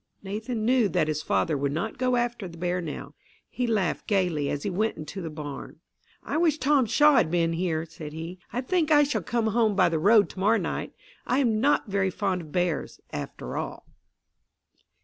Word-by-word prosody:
Nathan 220 Hz, +3 st, -3 dB
knew 245 Hz, -3 st, +3 dB
that 155 Hz, -2 st, +1 dB
his 155 Hz, -1 st, -1 dB
father 155 Hz, -, +1 dB
would 140 Hz, 0 st, -1 dB
not 200 Hz, -, -3 dB
go 255 Hz, 0 st, +2 dB
after 240 Hz, -4 st, -1 dB
the 170 Hz, -1 st, -11 dB
bear 180 Hz, +1 st, -1 dB
now. 160 Hz, -4 st, -6 dB, 0.3 s
He 250 Hz, -, -2 dB
laughed 205 Hz, -7 st, 0 dB
gaily 180 Hz, -8 st, +1 dB
as 145 Hz, -, -3 dB
he -, -, -1 dB
went 215 Hz, +5 st, 0 dB
into 160 Hz, +5 st, -6 dB
the 165 Hz, -, -4 dB
barn. 150 Hz, -1 st, -8 dB, 0.4 s
"I -, -, -2 dB
wish 320 Hz, -2 st, +3 dB
Tom 275 Hz, -3 st, +3 dB
Shaw 295 Hz, +4 st, +5 dB
had 175 Hz, -9 st, +3 dB
been 165 Hz, -1 st, +1 dB
here," 165 Hz, -2 st, -1 dB
said 155 Hz, -2 st, -9 dB
he. 165 Hz, +4 st, -7 dB
"I 250 Hz, -, -2 dB
think 325 Hz, +3 st, 0 dB
I 295 Hz, -1 st, +6 dB
shall 285 Hz, 0 st, -1 dB
come 240 Hz, -3 st, -1 dB
home 220 Hz, -1 st, +2 dB
by 185 Hz, -3 st, +4 dB
the 165 Hz, -2 st, 0 dB
road 205 Hz, +4 st, +5 dB
to -, -, -10 dB
morrow 210 Hz, +4 st, +4 dB
night. -, -, -3 dB, 0.3 s
I 250 Hz, -, +2 dB
am 230 Hz, -6 st, +2 dB
not 285 Hz, +3 st, +3 dB
very 195 Hz, -1 st, +1 dB
fond 190 Hz, -1 st, -1 dB
of 155 Hz, -3 st, -12 dB
bears, 175 Hz, -2 st, -1 dB
after 60 Hz, -, -6 dB
all." -, -, -5 dB
195 Hz, 205 wpm, -26 LUFS, 165-240 Hz, 0.4 s, I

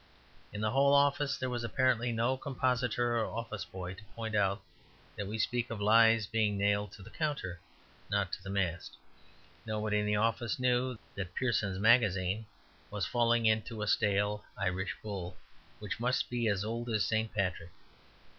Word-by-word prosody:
In 105 Hz, -, -5 dB
the 110 Hz, 0 st, +1 dB
whole 140 Hz, +2 st, +4 dB
office 140 Hz, 0 st, +3 dB
there 130 Hz, -, -2 dB
was 120 Hz, -1 st, -2 dB
apparently 120 Hz, 0 st, +1 dB
no 115 Hz, +3 st, +1 dB
compositor 125 Hz, -3 st, 0 dB
or 110 Hz, -, +1 dB
office 110 Hz, -2 st, -5 dB
boy 90 Hz, -1 st, -6 dB
to 95 Hz, +3 st, -13 dB
point 110 Hz, -1 st, -4 dB
out 100 Hz, -1 st, +1 dB, 0.5 s
that 100 Hz, -, -4 dB
we 110 Hz, +2 st, -4 dB
speak 120 Hz, +2 st, 0 dB
of 115 Hz, -, -5 dB
lies 115 Hz, +1 st, +5 dB
being 105 Hz, -1 st, 0 dB
nailed 100 Hz, 0 st, +1 dB
to 100 Hz, -, -12 dB
the 110 Hz, -, -12 dB
counter, 150 Hz, -, -2 dB
and 85 Hz, -1 st, -19 dB
not 100 Hz, -2 st, 0 dB
to -, -, -3 dB
the 95 Hz, -, -8 dB
mast. 90 Hz, -4 st, -2 dB, 0.7 s
Nobody 110 Hz, -1 st, -1 dB
in 105 Hz, -, -1 dB
the 105 Hz, -, +2 dB
office 115 Hz, +1 st, 0 dB
knew 125 Hz, 0 st, +1 dB, 0.2 s
that 95 Hz, -3 st, -6 dB
Pearson's 105 Hz, -7 st, 0 dB
Magazine 105 Hz, -2 st, +3 dB, 0.4 s
was 100 Hz, -4 st, -2 dB
falling 120 Hz, +2 st, +2 dB
into 110 Hz, 0 st, +1 dB
a -, -, -3 dB
stale 105 Hz, 0 st, +1 dB
Irish 95 Hz, +2 st, -1 dB
bull, 95 Hz, -4 st, -5 dB, 0.4 s
which 105 Hz, +2 st, -5 dB
must 125 Hz, +1 st, 0 dB
be 120 Hz, -2 st, 0 dB
as 100 Hz, -1 st, 0 dB
old 115 Hz, +2 st, -3 dB
as 110 Hz, -3 st, +1 dB
St. 110 Hz, 0 st, 0 dB
Patrick. 90 Hz, -5 st, -2 dB
110 Hz, 175 wpm, -32 LUFS, 100-120 Hz, 0.7 s, lies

